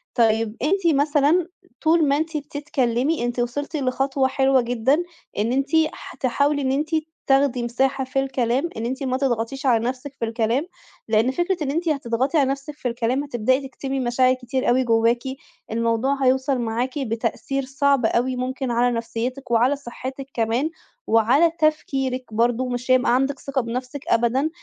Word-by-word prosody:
طيب 225 Hz, -2 st, +2 dB
أنتِ 340 Hz, +2 st, +2 dB
مثلًا 295 Hz, +4 st, +3 dB, 0.3 s
طُول 320 Hz, -1 st, +3 dB
ما 280 Hz, +1 st, +3 dB
أنتِ 315 Hz, 0 st, -2 dB
بتتكلمي، 285 Hz, -1 st, -1 dB
أنتِ 240 Hz, 0 st, -2 dB
وصَلتِ 265 Hz, +6 st, -2 dB
لخطوة 270 Hz, 0 st, +1 dB
حلوة 265 Hz, -1 st, +3 dB
جدًا، 245 Hz, +7 st, +1 dB, 0.3 s
إن 215 Hz, +3 st, +1 dB
أنتِ 270 Hz, +2 st, 0 dB, 0.2 s
ح -, -, -10 dB
تحاولي 285 Hz, +3 st, +1 dB
إن 260 Hz, -1 st, 0 dB
أنتِ 295 Hz, +3 st, -1 dB, 0.4 s
تاخدي 270 Hz, -2 st, +3 dB
مساحة 265 Hz, +3 st, 0 dB
في 260 Hz, +1 st, -1 dB
الكلام، 265 Hz, +2 st, 0 dB
إن 225 Hz, -, -3 dB
أنتِ 260 Hz, +3 st, -3 dB
ما 255 Hz, -1 st, 0 dB
تضغطيش 265 Hz, +1 st, -2 dB
على 235 Hz, -3 st, +3 dB
نَفسِك 260 Hz, +2 st, -4 dB
في -, -, 0 dB
الكلام 230 Hz, +5 st, 0 dB, 0.4 s
لأن 225 Hz, +3 st, +2 dB
فكرة 350 Hz, +3 st, -1 dB
إن 275 Hz, -, -1 dB
أنتِ 335 Hz, +2 st, -1 dB
هتضغطي 270 Hz, +1 st, 0 dB
على 270 Hz, -2 st, +3 dB
نَفْسِك 275 Hz, +2 st, -4 dB
في 260 Hz, -, -4 dB
الكلام 240 Hz, +3 st, -1 dB
هتبدئي 260 Hz, +1 st, 0 dB
تكتمي 270 Hz, 0 st, -4 dB
مشاعر 255 Hz, +1 st, +3 dB
كتير 255 Hz, 0 st, -2 dB
أوي 255 Hz, +2 st, +3 dB
جواكِ، 230 Hz, 0 st, +2 dB, 0.5 s
الموضوع 230 Hz, +4 st, 0 dB
هيوصَل 260 Hz, 0 st, +2 dB
معاكِ 240 Hz, +5 st, -2 dB
بتأثير 250 Hz, +3 st, -2 dB
صعب 275 Hz, -1 st, +2 dB
أوي 250 Hz, +3 st, +1 dB
ممكن 255 Hz, 0 st, -3 dB
على 240 Hz, +1 st, +2 dB
نفسيتِك 235 Hz, +3 st, -4 dB
وعلى 240 Hz, +4 st, +3 dB
صحتِك 265 Hz, 0 st, -7 dB
كمان، 230 Hz, +6 st, 0 dB, 0.4 s
وعلى 245 Hz, +9 st, +4 dB
تفكيرِك 270 Hz, -5 st, 0 dB
برضه، 240 Hz, +3 st, +1 dB
مش 245 Hz, +1 st, -2 dB
هيبقى 255 Hz, -1 st, +4 dB
عندِك 270 Hz, +1 st, 0 dB
ثقة 275 Hz, -2 st, -2 dB
بنَفْسِك 250 Hz, +4 st, -5 dB
أبدًا. 240 Hz, +6 st, +2 dB
260 Hz, 160 wpm, -23 LUFS, 240-280 Hz, 0.5 s, وعلى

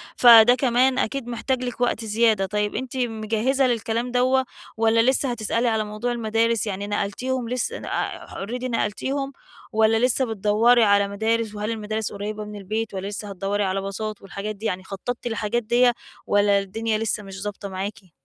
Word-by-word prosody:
فده 240 Hz, 0 st, +8 dB
كمان 255 Hz, 0 st, +2 dB
أكيد 255 Hz, +1 st, -2 dB
محتاج 250 Hz, +2 st, -2 dB
لِك 245 Hz, 0 st, -5 dB
وقت 235 Hz, -2 st, 0 dB
زيادة، 215 Hz, -2 st, +2 dB
طيب 210 Hz, +1 st, -2 dB
أنتِ 260 Hz, 0 st, -4 dB
مجهّزة 235 Hz, +3 st, 0 dB
للكلام 235 Hz, +1 st, -1 dB
دوّة 260 Hz, +1 st, +2 dB, 0.3 s
والّا 225 Hz, 0 st, +4 dB
لسه 265 Hz, -1 st, 0 dB
هتسألي 230 Hz, +1 st, -1 dB
على 220 Hz, -1 st, +1 dB
موضوع 215 Hz, +4 st, -3 dB
المدارس، 225 Hz, -1 st, 0 dB
يعني 200 Hz, +1 st, -3 dB
نقلتيهم 230 Hz, +5 st, -2 dB
لس 250 Hz, -, -1 dB
ن -, -, -7 dB
أ -, -, -3 dB
already 240 Hz, +6 st, -6 dB
نقلتيهم، 265 Hz, +4 st, -2 dB, 0.4 s
والّا 220 Hz, +2 st, +3 dB
لسّه 260 Hz, +1 st, +1 dB
بتدوّري 225 Hz, +2 st, +3 dB
على 200 Hz, -1 st, +4 dB
مدارس 220 Hz, +1 st, -1 dB
وهل 210 Hz, +2 st, -2 dB
المدارس 215 Hz, 0 st, -3 dB
قريبة 210 Hz, +1 st, -5 dB
من 210 Hz, 0 st, -8 dB
البيت، 215 Hz, +2 st, -3 dB
والَّا 190 Hz, +1 st, -4 dB
لسّه 205 Hz, 0 st, -6 dB
هتدوّري 200 Hz, +2 st, -1 dB
على 195 Hz, 0 st, -1 dB
باصات 205 Hz, +2 st, -5 dB
والحاجات 200 Hz, +2 st, -5 dB
دي، 215 Hz, +3 st, -9 dB
يعني 185 Hz, -2 st, -2 dB
خطّطتي 235 Hz, +5 st, -5 dB
للحاجات 225 Hz, +1 st, -1 dB
ديّة؟ 240 Hz, +2 st, +4 dB, 0.3 s
والَّا 205 Hz, -1 st, +4 dB
الدنيا 220 Hz, +3 st, -2 dB
لسّه 220 Hz, -1 st, -2 dB
مش 195 Hz, 0 st, -8 dB
ضابطة 205 Hz, -1 st, -5 dB
معاكِ؟ 190 Hz, -1 st, -6 dB
220 Hz, 170 wpm, -23 LUFS, 205-240 Hz, 0.4 s, فده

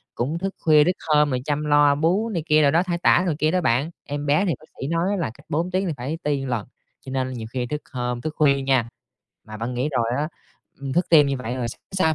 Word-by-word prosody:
cũng 145 Hz, +8 st, -2 dB
thức 195 Hz, +1 st, -3 dB
khuya 155 Hz, -2 st, +5 dB
thức 180 Hz, -, +2 dB, 0.2 s
hôm 150 Hz, -1 st, +4 dB
rồi 130 Hz, -2 st, -1 dB
chăm 150 Hz, 0 st, -1 dB
lo 145 Hz, -1 st, +4 dB
bú 180 Hz, +9 st, +1 dB
này 170 Hz, -8 st, -2 dB
kia 155 Hz, -1 st, +4 dB
đồ 140 Hz, -, +4 dB
đó, 170 Hz, +3 st, +3 dB
thay 175 Hz, -2 st, -2 dB
tã 175 Hz, +1 st, +4 dB
rồi 170 Hz, -4 st, 0 dB
kia 155 Hz, +1 st, +2 dB
đó 180 Hz, 0 st, +1 dB
bạn. 135 Hz, +4 st, +1 dB, 0.2 s
Em 145 Hz, 0 st, -4 dB
bé 150 Hz, +7 st, +3 dB
thì 170 Hz, -, +1 dB
bác 155 Hz, -, -17 dB, 0.2 s
sĩ 135 Hz, -, -2 dB
nói 175 Hz, +5 st, 0 dB
là 165 Hz, -, -1 dB
cách 145 Hz, +3 st, -20 dB
4 170 Hz, +5 st, -1 dB
tiếng 185 Hz, +1 st, 0 dB
thì 160 Hz, -, -1 dB
phải 135 Hz, +7 st, -4 dB
ti 140 Hz, -2 st, -1 dB
lần, 120 Hz, -5 st, -3 dB, 0.4 s
cho -, -, -8 dB
nên 130 Hz, -1 st, -2 dB
nhiều 115 Hz, -2 st, -6 dB
khi 125 Hz, -1 st, -2 dB
thức 150 Hz, +2 st, -4 dB
hôm, 125 Hz, -1 st, -2 dB
thức 155 Hz, 0 st, -4 dB
khuya 140 Hz, -3 st, +3 dB
nha. 130 Hz, -4 st, +1 dB, 0.6 s
Mà 110 Hz, 0 st, -9 dB
bạn 120 Hz, +3 st, -4 dB
nghĩ 125 Hz, +4 st, -1 dB
rồi 125 Hz, -6 st, 0 dB
á, 150 Hz, +2 st, -1 dB, 0.5 s
ừm, 135 Hz, -1 st, -4 dB
thức 175 Hz, +1 st, +1 dB
tim 150 Hz, -3 st, +7 dB
như 140 Hz, -1 st, -1 dB
vậy 125 Hz, -1 st, -4 dB
rồi 120 Hz, -2 st, -2 dB
sáng -, -, -9 dB, 0.3 s
hôm 160 Hz, -, +2 dB
145 Hz, 270 wpm, -23 LUFS, 130-165 Hz, 0.6 s, tim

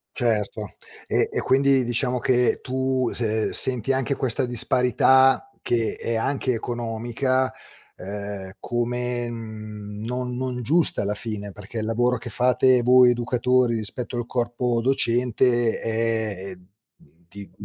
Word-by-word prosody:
Certo. 110 Hz, -4 st, -1 dB, 0.3 s
E -, -, +1 dB
e -, -, -1 dB
quindi, 135 Hz, 0 st, +3 dB
diciamo 125 Hz, +1 st, 0 dB
che 125 Hz, 0 st, +1 dB
tu, 130 Hz, -1 st, -1 dB
se 110 Hz, -2 st, -1 dB
senti 130 Hz, 0 st, +5 dB
anche 135 Hz, +1 st, -1 dB
questa 130 Hz, -1 st, +1 dB
disparità 130 Hz, +2 st, +3 dB
che 115 Hz, -2 st, -1 dB
è 115 Hz, -, -3 dB
anche 130 Hz, +2 st, -1 dB
economica. 120 Hz, +3 st, -2 dB, 0.5 s
Ehm, 100 Hz, 0 st, -7 dB
come, 120 Hz, 0 st, -2 dB
mhmm, 110 Hz, -2 st, -8 dB
non 125 Hz, +1 st, -4 dB
non 125 Hz, -1 st, -3 dB
giusta 160 Hz, +7 st, +2 dB
alla 105 Hz, +1 st, -1 dB
fine. 105 Hz, -2 st, -5 dB
Perché 105 Hz, +4 st, -9 dB
il 110 Hz, -, -3 dB
lavoro 120 Hz, +2 st, +1 dB
che 120 Hz, -, -8 dB
fate 125 Hz, +2 st, +3 dB
voi 125 Hz, +1 st, +6 dB
educatori, 125 Hz, 0 st, +1 dB
rispetto 115 Hz, +3 st, -2 dB
al 120 Hz, -, -4 dB
corpo 120 Hz, -1 st, -1 dB
docente 120 Hz, -2 st, +2 dB
è, 110 Hz, -4 st, -2 dB
ehm, 90 Hz, -1 st, -13 dB, 0.6 s
di 100 Hz, +2 st, -11 dB
120 Hz, 130 wpm, -23 LUFS, 110-125 Hz, 0.6 s, voi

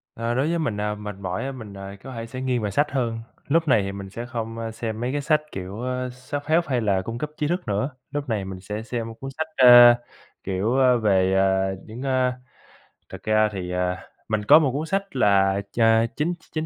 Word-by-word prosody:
Ờ, 115 Hz, +1 st, -2 dB
đối 135 Hz, +4 st, +1 dB
với 170 Hz, 0 st, 0 dB
mình, 120 Hz, -10 st, -1 dB
à, 105 Hz, 0 st, -1 dB
mệt 105 Hz, -1 st, -7 dB
mỏi 95 Hz, +3 st, -3 dB
á 135 Hz, -, -3 dB
mình, 110 Hz, -6 st, -9 dB
à, 100 Hz, 0 st, -8 dB
có 135 Hz, -, -8 dB
thể 115 Hz, -1 st, -5 dB
sẽ 130 Hz, +3 st, -7 dB
nghiêng 130 Hz, -2 st, 0 dB
về 105 Hz, -1 st, -2 dB
sách 145 Hz, +9 st, +1 dB
hơn. 120 Hz, -4 st, -1 dB, 0.3 s
Lúc 165 Hz, +2 st, +2 dB
này 110 Hz, -7 st, +4 dB
thì 100 Hz, -, -3 dB
mình 100 Hz, 0 st, -7 dB
sẽ 115 Hz, +5 st, -6 dB
không, 115 Hz, -2 st, -5 dB
a, 115 Hz, 0 st, -4 dB
xem 110 Hz, -1 st, -5 dB
mấy 120 Hz, +2 st, -2 dB
cái 145 Hz, +1 st, -1 dB
sách, 150 Hz, +1 st, +2 dB
kiểu, 95 Hz, +4 st, -6 dB
ơ, 125 Hz, 0 st, -2 dB
self-help 145 Hz, +6 st, -1 dB
hay 125 Hz, -4 st, 0 dB
là 100 Hz, -3 st, +1 dB
cung 115 Hz, +5 st, -5 dB
cấp 150 Hz, +4 st, -4 dB
trí 150 Hz, -, 0 dB
thức 175 Hz, -1 st, -2 dB
nữa, 105 Hz, +6 st, 0 dB, 0.2 s
lúc 145 Hz, -2 st, -4 dB
này 105 Hz, -4 st, -1 dB
mình 95 Hz, -1 st, -7 dB
sẽ 105 Hz, +3 st, -5 dB
xem 115 Hz, 0 st, -4 dB
cuốn 135 Hz, -, -6 dB
sách, 160 Hz, -, -1 dB
ơ, 120 Hz, -1 st, +9 dB, 0.5 s
kiểu, 100 Hz, +7 st, 0 dB
a, 130 Hz, -1 st, +5 dB
về, 95 Hz, -5 st, +2 dB
à, 95 Hz, 0 st, +2 dB
những, 110 Hz, +3 st, -9 dB
a 130 Hz, -2 st, +1 dB, 0.8 s
thực -, -, -8 dB
ra 110 Hz, 0 st, +3 dB
thì, 90 Hz, -3 st, -5 dB
à, 90 Hz, 0 st, -1 dB, 0.3 s
mình 110 Hz, -1 st, -1 dB
có 150 Hz, +7 st, +8 dB
một 145 Hz, -5 st, +1 dB
cuốn 150 Hz, +4 st, -3 dB
sách 195 Hz, +2 st, -2 dB
là 100 Hz, -1 st, +3 dB
ch -, -, -9 dB, 0.4 s
chín 155 Hz, +4 st, 0 dB, 0.2 s
chín 155 Hz, 0 st, -1 dB
115 Hz, 235 wpm, -24 LUFS, 100-135 Hz, 0.8 s, ơ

